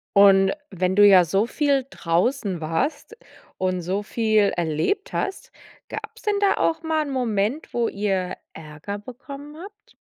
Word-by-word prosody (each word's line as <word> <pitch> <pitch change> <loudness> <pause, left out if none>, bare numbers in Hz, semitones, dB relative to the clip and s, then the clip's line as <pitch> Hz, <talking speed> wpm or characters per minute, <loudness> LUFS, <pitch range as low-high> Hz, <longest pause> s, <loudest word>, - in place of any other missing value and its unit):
Und 195 -1 +6 0.2
wenn 185 0 -1
du 205 0 +8
ja 190 -3 +7
so 195 +6 +1
viel 280 +1 +1
draußen 190 0 -1
warst 165 - -2 0.4
und 185 -1 -1
so 190 +4 -2
viel 215 -2 +2
erlebt 170 - -1
hast, 390 - -3 0.4
gab's - - -8
denn 420 -3 +1
da 400 - +4
auch 320 -1 0
mal 320 -1 0
'n 285 - -5
Moment, 240 +1 -1
wo 235 -1 +1
ihr 195 -3 -2 0.2
Ärger 155 +6 -7
bekommen 280 +6 -10
habt? 410 +5 -13
205 Hz, 150 wpm, -23 LUFS, 185-280 Hz, 0.4 s, du